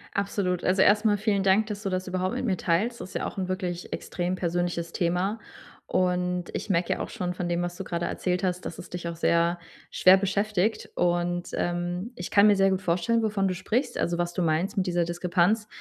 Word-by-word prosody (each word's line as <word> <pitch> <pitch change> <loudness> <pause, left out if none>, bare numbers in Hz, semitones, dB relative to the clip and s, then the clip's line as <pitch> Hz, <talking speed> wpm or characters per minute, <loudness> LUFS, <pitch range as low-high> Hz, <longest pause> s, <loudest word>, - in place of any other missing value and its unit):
Absolut, 195 -3 -1
also, 190 +1 +3
erst 210 +3 +4
mal 210 -2 +4
vielen 200 -2 +1
Dank, 195 +3 +4
dass 210 -1 -5
du 195 - -2
das 185 0 -2
überhaupt 185 +4 -1
mit 255 - -3
mir 195 -6 +1
teilst, 210 +10 0
das 185 - -7
ist - - -13
ja - - -2
auch - - -6
'n 185 -1 -2
wirklich 180 -2 -4
extrem 180 +1 -2
persönliches 175 -1 -2
Thema, 180 +5 0 0.5
und 180 -1 0
ich - - -4
merke 175 -2 +1
ja - - -8
auch - - -3
schon 180 -6 -3
von 180 -1 -3
dem, 175 0 0
was 175 0 -4
du - - -3
grade 170 -1 -3
erzählt 180 0 -1
hast, 180 -1 -1
dass - - -6
es - - -10
dich 175 -1 -4
auch 170 - -5
sehr 170 +1 +2 0.3
schwer 185 +1 +6
beschäftigt, 200 +1 0
und, 175 0 0
ähm, 175 +5 -2
ich 175 - -6
kann 200 +1 +6
mir 205 -1 +5
sehr 195 0 +4
gut 190 0 0
vorstellen, 185 +7 +1
wovon 205 -3 +1
du 185 - -1
sprichst, 240 +8 -1
also, 170 - 0
was 175 0 -1
du 185 - -2
meinst 170 +7 0
mit 190 - +1
dieser 175 -1 +1
Diskrepanz. 180 +5 +1
180 Hz, 230 wpm, -26 LUFS, 175-200 Hz, 0.5 s, schwer